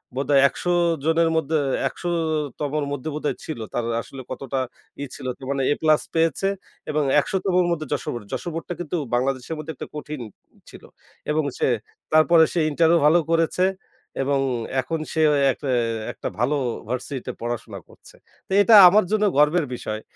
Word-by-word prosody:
বোধহয় 140 +1 +3
১০০ 175 - -3 0.3
জনের 165 +1 +3
মধ্যে, 160 0 +1 0.3
১০০ 175 - -5 0.5
তমর 150 0 -1
মধ্যে 145 +2 -4
বোধহয় 150 0 -2
ছিল। 155 -7 -5
তার 120 - -1 0.2
আসলে 135 +2 -10
কতটা 135 +1 -3 0.4
ই 145 - -2
ছিল - - -10
কি - - -15
মানে, 140 -1 0 0.2
A+ 155 -1 +4
পেয়েছে 165 +3 +1 0.4
এবং 150 -1 +1 0.2
১০০ 190 - -1
তমর 180 -1 +3
মধ্যে 155 -2 -2
যশোর 145 - -2
বোর্ড 120 -3 -7
এ। - - -23
যশোর 175 - -3
বোর্ডটা 165 +1 -4
কিন্তু 175 0 -3 0.2
বাংলাদেশের 130 +4 -1
মধ্যে 155 +1 -6
একটা - - -7
কঠিন 150 -2 -6 0.5
ছিল। - - -13 0.5
এবং 155 +1 +1
সে, - - +1 0.5
তারপরে 160 +1 +6
সে 175 - +1
ইন্টারও 165 +3 +3
ভালো 165 +3 +6
করেছে 165 +2 +2 0.6
এবং 140 +1 +1 0.4
এখন 160 +5 -3
সে 160 - 0
অয় 140 -1 +2
একটা 140 +1 -6 0.4
একটা - - -6
ভালো 135 +5 +1 0.3
ভার্সিটি 125 +2 -4
তে - - -1
পড়াশোনা 115 -4 -5
করছে। - - -18 0.3
তো - - -18
এটা 225 - +5 0.2
আমার 210 +2 +4
জন্য 215 -1 +2
গর্বের 150 +3 +4
বিষয় 110 -2 -5
150 Hz, 170 wpm, -23 LUFS, 135-165 Hz, 0.6 s, তারপরে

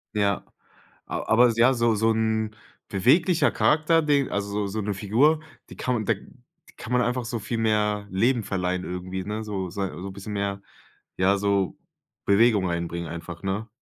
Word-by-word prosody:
Ja, 100 -2 +1 0.6
a - - -3
aber 120 +2 +6
ja, 120 +3 +5
so 115 -2 +2
so 110 +2 +2
'n 110 -1 0 0.3
beweglicher 155 - +3
Charakter 160 +2 +3
den 145 -3 +2
also, 100 0 -2
so 110 +2 -3
'ne 100 +1 -2
Figur, 125 +11 +3 0.3
die - - -10
kann 125 - -1
man 110 - -2
da - - +3 0.6
kann 120 - -6
man 125 - +4
einfach 125 0 -1
so 115 0 -3
viel 115 +2 -3
mehr 105 -2 +1
Leben 115 +5 +2
verleihen 90 -2 -2
irgendwie, 90 +1 -5
ne, 105 +1 -3
so 100 -4 -4
sei 95 +1 -3
so 90 +2 -7
'n - - -9
bisschen 100 +2 -7
mehr, 100 -1 -2 0.6
ja, 95 +2 +3
so 100 -1 0 0.5
Bewegung 100 -2 +4
reinbringen 85 0 -3
einfach, 85 +1 -8
ne? 100 +4 -2
105 Hz, 175 wpm, -25 LUFS, 95-115 Hz, 0.6 s, aber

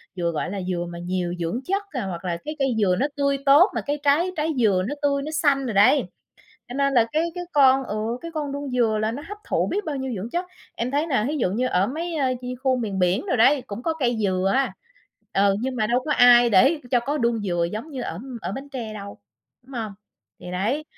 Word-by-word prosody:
dừa 170 -2 -1
gọi 160 +2 -3
là 200 -2 -3
dừa 180 -1 -2
mà 170 0 -7
nhiều 175 0 -2
dưỡng 170 +8 -2
chất, 395 +2 -1
à, 250 -8 -3
hoặc 180 -1 -6
là 170 -1 -1
cái 305 +1 -4
cây 270 -4 +1
dừa 185 -3 +3
nó 280 - +2
tươi 280 -1 +1
tốt 295 +9 +7
mà - - 0
cái 290 0 -3
trái 320 +6 +3
trái 310 +1 0
dừa 195 -5 +3
nó 290 - -3
tươi 280 -1 +1
nó 305 +2 -5
xanh 285 -3 +2
rồi 230 - -2
đấy. 205 +9 +5 0.7
Cho 245 - -7
nên 275 0 +1
là 235 -2 +5
cái 315 +2 +2
cái 355 0 -4
con, 270 -2 +5
ừ, 210 - -4 0.2
cái 335 - -7
con 290 -2 -3
đuông 285 -1 -4
dừa 230 -4 +1
là 220 +1 0
nó 285 +4 -6
hấp 415 0 -7
thụ - - +1
biết 410 +1 -2
bao 300 -3 -3
nhiêu 265 -1 -3
dưỡng 215 +6 -5
chất. 350 +1 -1 0.3
Em 235 +2 -2
thấy 295 +3 0
nè, 255 -8 +1
thí 305 - -2
dụ 210 -9 0
như 245 +6 0
ở 190 -4 +2
mấy, 330 +6 -4
ơ, 270 -3 +1
như 250 0 -5
khu 260 -1 +2
miền 205 -5 -3
biển 180 - +1
đồ 335 - +1
đấy, 260 +4 +4
cũng 210 +4 -6
có 325 -1 0
cây 240 -2 +1
dừa 190 0 +1
á, 270 0 +1 0.6
ừ, 195 0 +3
nhưng 260 0 -2
mà 215 -1 +1
đâu 245 +3 +1
có 300 - 0
ai 245 -2 +7
để 270 - +4
cho 245 -2 +3
có 285 +5 -2
đuông 235 -1 +1
dừa 175 -4 0
giống 230 +9 -5
như 260 -3 -5
ở 165 - -5 0.2
ở 180 +3 -4
Bến 275 +4 -7
Tre 240 -6 -6
đâu, 200 -1 -8 0.4
đúng 270 +2 -17
hông? 220 -3 -4 0.5
Thì 180 - -8
đấy, 225 +12 -1
250 Hz, 255 wpm, -24 LUFS, 200-285 Hz, 0.7 s, tốt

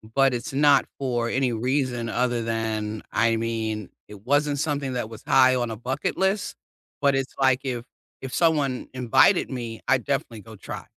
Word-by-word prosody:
but 135 -2 +4
it's 120 +2 -5
not 145 +1 +5
for 120 -3 -1
any 130 0 +1
reason 125 0 -1
other 120 0 0
than 110 -1 -2
I 115 0 +2
mean, 110 -3 -3 0.2
it 105 -1 -12
wasn't 145 +1 +1
something 145 -3 -1
that 120 -3 -3
was 110 -2 -11
high 130 -1 +5
on 120 -2 -1
a - - -4
bucket 130 +5 -2
list, 190 +2 0 0.5
but 140 -1 +3
it's 135 0 -2
like 130 -1 +3
if 125 -3 -3 0.4
if 130 -1 -7
someone 150 -6 +1
invited 130 - +3
me, 115 -3 -5
I'd 130 -2 +3
definitely 130 -5 -2
go 110 +3 -12
try, - - -8
125 Hz, 175 wpm, -25 LUFS, 115-135 Hz, 0.5 s, not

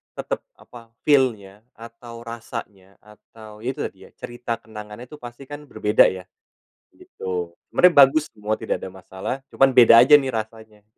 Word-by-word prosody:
tetep - - -4 0.2
apa, 115 -1 -16
feel-nya 110 -9 +1 0.2
atau 115 0 -12
rasanya 110 -4 -9
atau 105 0 -16
ya 120 - -8
itu - - -4
tadi - - -7
ya, - - -21
cerita 120 -1 -6
kenangannya 105 +1 -10
itu 150 - -11
pasti 120 +1 -11
kan 145 +2 -11
berbeda 105 -4 +3
ya, 95 -1 -5 0.7
gitu. 90 -2 -7 0.2
Sebenarnya 180 -1 +5
bagus 155 +4 -1
semua 105 0 -6
tidak - - -2
ada 95 - -9
masalah. 95 +4 -6
Cuman 135 0 +3
beda 120 -1 +7
aja 150 - 0
nih 135 - -4
rasanya. 110 -2 -7
115 Hz, 160 wpm, -22 LUFS, 105-125 Hz, 0.7 s, beda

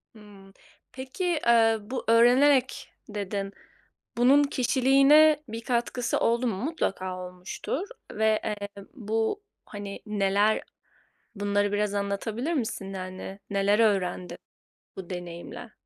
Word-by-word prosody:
Hımm. 200 -2 -16 0.4
Peki, 260 +7 -6 0.2
eee, 225 -1 +5
bu, 235 +5 -5
öğrenerek 250 +3 +4 0.2
dedin. 200 -1 -4 0.6
Bunun 265 +4 +5
kişiliğine 280 +3 +4
bir 225 +1 -5
katkısı 240 0 -1
oldu 235 +2 +1
mu? 220 - -1
Mutlaka 190 - -2
olmuştur 180 - -5 0.3
ve, 220 0 +2
eee, 205 -1 -5
bu, 225 - -2 0.2
hani, 205 -1 -7
neler? 205 0 +1 0.7
Bunları 205 0 0
biraz 205 0 0
anlatabilir 205 +8 -2
misin? 220 - -3
Yani, 185 +1 -7
neler 200 +1 +2
öğrendin 185 -5 0 0.6
bu 190 -2 -8
deneyimle? 175 +6 -8
215 Hz, 105 wpm, -27 LUFS, 200-250 Hz, 0.7 s, eee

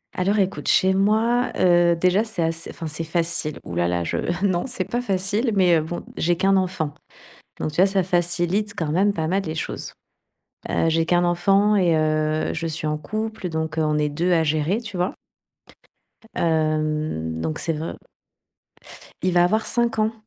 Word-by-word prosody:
Alors 195 +3 +1
écoute, 190 -1 -1
chez 190 0 +4
moi, 220 +5 +2
heu, 175 -1 +4
déjà 185 +5 +2
c'est 220 -6 -4
assez 165 0 -2
enfin 165 - -7
c'est 155 +2 -4
facile, 165 -2 -1
ouh 85 - -8
là 85 0 +1
là 85 -1 -1
je - - -2 0.3
non, 185 -1 +1
c'est 260 - -3
pas 240 0 -2
facile. 200 +3 0
Mais 180 -3 +4
heu, 160 - +2
bon, 165 +3 -5
j'ai 175 +1 +1
qu'un 195 +3 +3
enfant 180 -6 -1 0.6
donc 155 - -2
tu - - -9
vois, 185 - +6
ça 195 -1 +1
facilite 175 +3 0
quand 160 -3 -2
même 195 +5 +3
pas 160 -5 -2
mal 190 +4 0
les 160 -3 -5
choses, - - -5 0.8
heu, 165 - +1
j'ai 165 0 +2
qu'un 175 +1 +2
enfant 195 +4 +3
et 175 -4 +3
heu, 155 0 0
je 165 - -3
suis 160 -1 -3
en 150 0 0
couple, 215 +4 -4
donc 160 -1 -3
heu, - - +3
on 150 0 +1
est 150 0 +1
2 170 +5 0
à 165 -2 +4
gérer, 155 +7 0
tu 205 -5 -8
vois? 180 +1 -1 1.2
Hem, 155 - -1
donc 80 -1 -3
c'est 165 - -1
vr 160 +1 -5 1.2
Il 185 - +1
va 175 - +5
avoir 215 +5 +1
5 235 -2 0
ans. 215 +1 +1
175 Hz, 190 wpm, -23 LUFS, 155-195 Hz, 1.2 s, vois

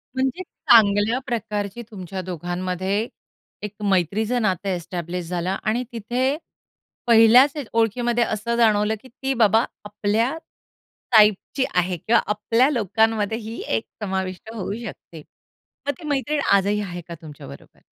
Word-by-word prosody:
म्हणजे 265 +7 -1
चांगल्या 220 - +3
प्रकारची 210 -2 -3
तुमच्या 185 -1 -6
दोघांमध्ये 185 +4 -2 0.6
एक 210 0 -5
मैत्रीचं 205 +6 +1
नातं 195 -1 0
एस्टॅब्लिश 175 0 -4
झालं 180 +2 -2
आणि 235 +4 0
तिथे 245 +5 -1 0.7
पहिल्याच 235 +4 +7 0.2
ओळखीमध्ये 235 +1 +1
असं 225 +2 -2
जाणवलं, 215 -1 +3
की 260 - -15
ती 265 +3 -3
बाबा 225 -1 +4 0.2
आपल्या 210 +5 0 0.8
टाइपची 215 +5 +4
आहे 180 0 +1
किंवा 225 +8 +2
आपल्या 230 +6 +2
लोकांमध्ये 220 - +1
ही 225 0 -7 0.2
एक - - -4 0.2
समाविष्ट 190 0 -4
होऊ 205 -2 -4
शकते. 165 -5 -10 0.7
मग - - +3
ती 320 - -10
मैत्रीण 290 +1 0
आजही 200 +1 +3
आहे 175 -3 -6
का 170 - -7
तुमच्याबरोबर? 145 - -12
210 Hz, 125 wpm, -23 LUFS, 185-235 Hz, 0.8 s, पहिल्याच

